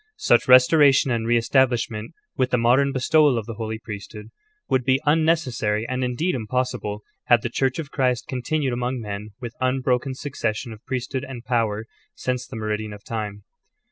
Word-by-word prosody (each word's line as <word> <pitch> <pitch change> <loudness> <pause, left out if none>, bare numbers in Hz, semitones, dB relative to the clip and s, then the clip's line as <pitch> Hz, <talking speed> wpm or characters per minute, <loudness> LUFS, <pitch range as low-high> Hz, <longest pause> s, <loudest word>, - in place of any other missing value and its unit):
Such 120 - +3
restoration 130 +1 +6
and 115 -1 -1
re 120 0 +4
estabiishment, 115 -2 +1 0.2
with 130 -1 +1
the 125 - +2
modern 125 +4 +3
bestowal 145 0 +3
of 110 - -3
the 115 - -6
Holy 110 0 -4
Priesthood, 105 0 -9 0.4
would 130 -1 +1
be 130 +2 +2
unnecessary 145 -9 +1
and 130 0 -2
indeed 140 +9 -1
impossible 110 -3 -2 0.2
had 120 -2 +4
the 120 - -1
Church 130 +2 0
of 150 -3 -5
Christ 125 -3 0
continued 130 +1 -1
among 125 +1 -2
men 105 -1 -6
with 120 -2 -6
unbroken 130 0 0
succession 120 -5 -3
of 110 - -14
Priest 130 0 -4
hood 130 - -1
and 125 -3 -8
power, 110 -3 0 0.3
since 125 0 -3
the 130 - -9
''meridian 110 -1 -3
of 100 - -15
time." 105 -3 -5
125 Hz, 170 wpm, -23 LUFS, 110-130 Hz, 0.4 s, restoration